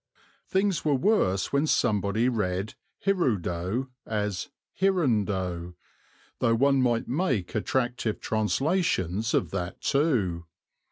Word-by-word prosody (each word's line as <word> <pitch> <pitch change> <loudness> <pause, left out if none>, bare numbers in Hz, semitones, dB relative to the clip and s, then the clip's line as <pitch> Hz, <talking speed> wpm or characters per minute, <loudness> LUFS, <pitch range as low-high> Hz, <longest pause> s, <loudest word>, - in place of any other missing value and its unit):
Things 190 -1 +1
were 150 -2 +2
worse 130 - +1
when 140 +3 +2
somebody 110 -3 +2
read 105 -4 -1 0.3
hirudo 115 - 0
as 105 +3 -2 0.3
hirundo, 100 - 0 0.6
though 115 -1 +3
one 135 +2 +3
might 120 -2 +1
make 130 - -1
attractive 120 0 -1
translations 110 - 0
of - - 0
that 90 -2 -4
too. 110 - +1
115 Hz, 100 wpm, -27 LUFS, 95-140 Hz, 0.6 s, though